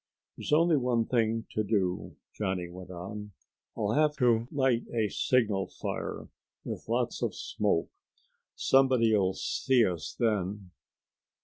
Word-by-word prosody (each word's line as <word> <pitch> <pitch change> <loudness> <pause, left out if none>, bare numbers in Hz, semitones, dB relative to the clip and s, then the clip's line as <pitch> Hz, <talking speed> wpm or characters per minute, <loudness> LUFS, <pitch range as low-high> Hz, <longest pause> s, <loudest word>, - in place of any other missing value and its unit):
"There's - - -6
only 160 +1 +5
one 125 -3 +1
thing 115 -2 +1
to 110 - 0
do," 95 -4 -1 0.2
Johnny 95 -4 -2
went 90 +1 -10
on. 100 +3 -7 0.4
"I'll 105 0 0
have 150 +3 +3
to 120 -3 +3
light 130 -5 +1
a 110 -3 0
signal 105 -7 +1
fire - - -5 0.4
with - - -6
lots - - 0
of - - -1
smoke. 100 -6 -1 0.6
Somebody'll 115 -8 +3
see 125 +2 +2
us 85 -5 -3
then." 100 -4 -1
110 Hz, 125 wpm, -29 LUFS, 95-125 Hz, 0.6 s, only